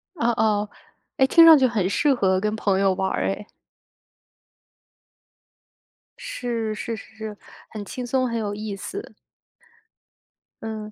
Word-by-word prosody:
哦 265 -8 -1
哦， 210 -2 +1 0.5
诶， 265 - +4
听 330 +4 +7
上 325 -1 +10
去 260 -2 +4
很 210 -6 0
适 290 +7 +2
合 190 -6 +2
跟 210 +2 -1
朋 200 -3 0
友 195 -1 +3
玩 190 +1 -1
儿 - - -1
诶。 200 +2 -4 2.7
是 235 - -3
是 230 +2 -4
是 220 - -13
是， 215 -1 -7 0.3
很 210 -2 -7
轻 250 +4 -6
松、 255 +1 0
很 235 -1 -2
有 205 -2 -3
意 210 -1 -5
思。 400 - -7 1.5
嗯， 220 -1 -6
220 Hz, 150 characters per minute, -23 LUFS, 205-245 Hz, 2.7 s, 上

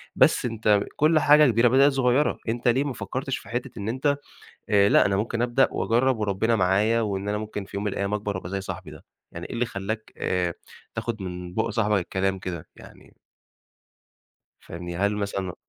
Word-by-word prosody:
بس - - +4
أنت 110 -3 +2 0.2
كل 155 +1 +4
حاجة 150 0 +6
كبيرة 115 +2 +4
بدأت 135 +4 +5
صغيرة، 135 +1 +2
أنت 120 +2 -2
ليه 125 +3 +3
ما 145 -2 -3
فكّرتش 130 +6 -4
في - - -13
حتّة 120 +1 -3
إن 100 +2 -3
أنت 140 +4 0 0.5
آآ 100 -1 +5
لأ، - - +5
أنا 100 -1 +1
ممكن 115 +3 -2
أبدأ 125 +2 +3
وأجرّب 125 +2 +1
وربِّنا 105 +2 +1
معايا 105 +4 +2
وإن 100 -2 -2
أنا 105 - 0
ممكن 105 -2 -5
في 100 - -7
يوم 100 - -3
من 105 - -1
الأيام 100 +1 -2
أكبر 105 -1 -2
وأبقى 85 - -7
زي 100 0 -2
صاحبي 95 -4 -7
ده؟ 75 - -13 0.3
يعني - - -7
إيه - - -8
اللي 120 +1 0
خلّاك 110 +1 -5
آآ 90 -2 -1 0.4
تاخًد 115 -3 -3
من 90 -1 -6
بُقّ 110 +3 0
صاحبك 105 -2 +1
الكلام 95 +1 -1
كده؟ 85 -4 -6
يعني - - -16 1.4
فاهمني؟ 85 0 -7
هل 100 +3 +1
مثلًا 100 -3 -3
105 Hz, 190 wpm, -25 LUFS, 95-120 Hz, 1.4 s, حاجة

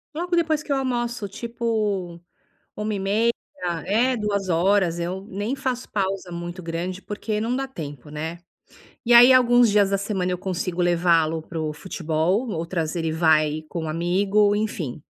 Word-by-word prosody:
Logo 350 +2 -1
depois 315 -2 +1
que 290 - -6
eu - - +3
almoço 240 -5 -2
tipo, 215 -6 -2 0.6
13:30, 210 +2 0 0.5
é, 240 +6 +2
14:00, 195 -3 +1
eu 185 +3 -4
nem 205 +7 -2
faço 260 -2 -3
pausa 195 -2 -2
muito 175 +1 -6
grande, 175 +3 -4
porque 210 +1 -3
não 230 +3 -1
dá 270 +1 -2
tempo, 150 - -8
né. 160 +3 -5 0.7
E, 240 - +4
aí, 245 +2 +9
alguns 245 -2 +5
dias 205 -1 +4
da 195 - +2
semana 190 -2 -2
eu 180 - -1
consigo 180 -1 -3
levá-lo 165 -2 +2
para 165 0 -6
o 155 -1 -2
futebol, 175 +6 -1
outras 165 -2 -2
ele 165 -1 -1
vai 155 -1 +2
com 170 -2 -4
um - - -4
amigo, 195 +5 +2
enfim. 165 - -3
195 Hz, 155 wpm, -23 LUFS, 170-225 Hz, 0.7 s, aí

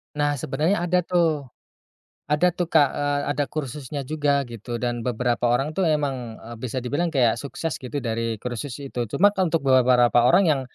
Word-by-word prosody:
Nah, 145 -1 0
sebenarnya 150 +10 0
ada 180 +1 +2
tuh. 165 -6 0 0.8
Ada 150 +5 +3
tuh 175 0 -3
Kak, 150 -4 +4
eee, 145 0 -1
ada 145 0 0
kursusnya 145 -1 -5
juga 145 0 0
gitu, 120 +1 -6
dan 120 -1 -1
beberapa 120 0 0
orang 135 +5 +1
tuh 180 +2 0
emang, 135 -7 -1
e 115 - -11
bisa 125 +1 -4
dibilang 145 +8 -1
kayak 130 -9 +2
sukses 145 +1 -4
gitu 130 +2 -5
dari 115 -1 -2
kursus 125 +1 -4
itu. 125 -3 -4
Cuma 200 - +2
untuk 165 -5 +1
beberapa 125 -2 +4
orang 175 +10 +5
yang, 140 -3 +2
140 Hz, 175 wpm, -24 LUFS, 125-155 Hz, 0.8 s, orang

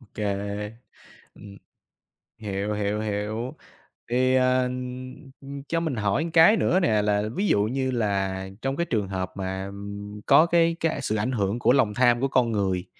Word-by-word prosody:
OK. 105 -3 -6 1.1
Ừm, 100 -1 -12 0.8
hiểu, 105 -1 -3
hiểu, 105 0 -1
hiểu. 110 +3 -3 0.6
Thì, 130 +1 +3
ờ, 130 0 +3 0.8
ừm, 140 0 -8
cho 165 - +1
mình 160 -6 -2
hỏi 105 +7 0
một - - -4
cái 170 +7 +7
nữa 185 - +2
nè, 110 - +2
là 105 0 +1
ví 205 +1 0
dụ 100 - +3
như 130 +4 -1
là 95 -5 -1 0.2
trong 135 0 -1
cái 170 - 0
trường 105 - -1
hợp 95 -1 -3
mà, 95 0 -3
ừm, 100 +1 -8
có 160 - +6
cái 170 -1 +3
cái, 165 -1 +1
a, 140 - -5
sự 110 -5 -1
ảnh 110 +4 -1
hưởng 105 -1 -1
của 120 - +3
lòng 105 -6 +2
tham 120 +1 +3
của 135 - +2
con 125 -3 +2
người. 95 -3 -1
110 Hz, 180 wpm, -25 LUFS, 100-130 Hz, 1.1 s, cái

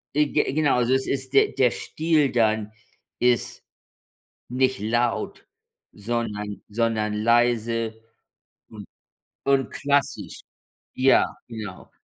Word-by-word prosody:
E 150 - +5
ge - - +3
genau, 150 -3 +2
also, 125 +1 +2
es 130 0 +1
ist 130 0 -3
der 135 - +5
der 125 -3 +2
Stil 155 -3 0
dann 110 -2 +1 0.5
ist 125 -1 +1 0.9
nicht 130 +1 +1
laut, 120 +2 -1 0.5
sondern 105 -2 -4
sondern 110 -1 0
leise 115 0 +1 0.7
und - - -10 0.6
und 135 -1 +2
klassisch. 140 0 -1 0.5
Ja, 130 +1 +4 0.2
genau. 105 -5 -8
120 Hz, 105 wpm, -24 LUFS, 110-130 Hz, 0.9 s, E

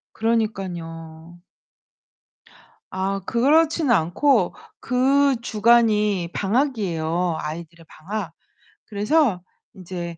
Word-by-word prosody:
그러니깐요. 175 -7 -3 1.5
아 195 +1 -2
그렇진 300 +4 +2
않고 210 - +2 0.3
그 270 +2 +2
주간이 210 -5 +2
방학이에요 180 - -1
아이들의 165 +1 -8
방학. 190 0 -6 0.5
그래서 210 - +1 0.3
인제 175 -3 -7
200 Hz, 185 characters per minute, -22 LUFS, 170-235 Hz, 1.5 s, 그렇진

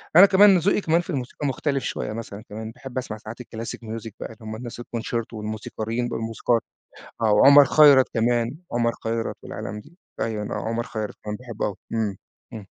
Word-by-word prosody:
أنا 180 +4 +11
كمان 200 -1 +7
ذوقي 195 +4 +2
كمان 170 -1 +2
في 175 - -15
الموسيقى 140 -1 -3
مختلف 140 0 -1
شوية 105 - -3
مثلًا 110 -2 -7
كمان، 110 +1 -6
باحب 130 +2 -9
أسمع 120 -4 -3
ساعات 110 +3 -9
الclassic 115 -1 -6
music 115 0 -6
بَقى - - -6
اللي - - -19
هُم 110 0 -6
الناس 120 +1 -7
الconcerto 115 -1 -4
والموسيقاريين 110 +2 -3
والموسيقار، 115 +1 0 0.6
آه 110 - +3
وعمر 140 +6 +8
خيرت 140 -2 +7
كمان، 120 +3 +1
عمر 120 0 +2
خيرت 115 0 -2
والعالم 105 +2 -6
دي، 165 +11 -17 0.2
أيوًا 110 -2 -2
آه 105 - -4
عمر 115 +1 -1
خيرت 110 -3 -5
أنا 105 - -2
باحبه 120 -3 -4
أوي، 100 - -3 0.2
إمم، 110 -3 0 0.4
إمم. 110 -3 -7
115 Hz, 185 wpm, -24 LUFS, 110-130 Hz, 0.6 s, أنا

